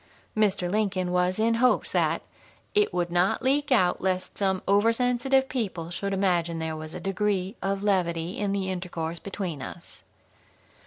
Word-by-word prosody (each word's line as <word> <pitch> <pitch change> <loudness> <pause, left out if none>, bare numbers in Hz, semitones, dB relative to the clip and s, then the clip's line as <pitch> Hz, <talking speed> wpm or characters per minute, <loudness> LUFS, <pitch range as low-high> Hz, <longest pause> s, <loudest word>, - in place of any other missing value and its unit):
Mr. 200 -4 +2
Lincoln 190 -2 0
was 180 +1 +1
in 225 +1 +2
hopes 255 - +3
that - - +1 0.5
"it 420 -1 +3
would 175 -1 -1
not 175 +2 +2
leak 275 +2 +1
out 185 -8 +3
lest 185 -1 -1
some 190 -2 0
oversensitive 245 +6 +3
people 190 -10 -3
should 200 +3 -3
imagine 175 -4 +1
there 160 -1 -3
was 155 0 -7
a - - -4
degree 195 0 -1
of 195 0 -1
levity 175 -3 0
in 205 -1 0
the 195 -1 -1
intercourse 170 -2 -4
between 185 -7 -5
us." - - -10
190 Hz, 155 wpm, -27 LUFS, 175-210 Hz, 0.5 s, hopes